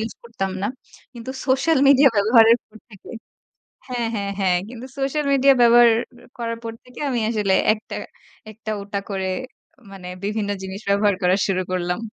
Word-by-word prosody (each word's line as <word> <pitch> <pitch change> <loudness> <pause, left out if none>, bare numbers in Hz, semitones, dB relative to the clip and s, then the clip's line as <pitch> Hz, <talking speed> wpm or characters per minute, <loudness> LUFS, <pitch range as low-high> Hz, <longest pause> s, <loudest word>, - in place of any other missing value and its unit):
Use 225 +1 -4
করতাম 225 -5 -4
না। - - 0 0.5
কিন্তু 235 +2 -7 0.2
সোশ্যাল 270 +3 +2
মিডিয়া 275 0 +7
ব্যবহারের 225 +3 +5
পর 220 0 -16
থেকে 200 - -13 0.8
হ্যাঁ, 240 -2 -2
হ্যাঁ, 200 -1 -3
হ্যাঁ। 185 -2 +2
কিন্তু 245 +1 -9
সোশ্যাল 280 +2 -1
মিডিয়া 275 0 +5
ব্যবহার 240 0 +7 0.3
অ্যা - - -18
করার 230 -1 -3
পর 230 - -4
থেকে 250 - -14
আমি 245 - -1
আসলে 210 -4 0 0.2
একটা 215 - -9 0.6
একটা 215 0 -7
ওটা 200 0 -4
করে 190 -1 -2 0.6
মানে 190 -2 -10 0.2
বিভিন্ন 210 0 -2
জিনিস 190 +2 -7
ব্যবহার 200 0 +3
করা 180 +1 +4
শুরু 190 -2 0
করলাম। 180 +1 -1
220 Hz, 165 wpm, -21 LUFS, 200-240 Hz, 0.8 s, মিডিয়া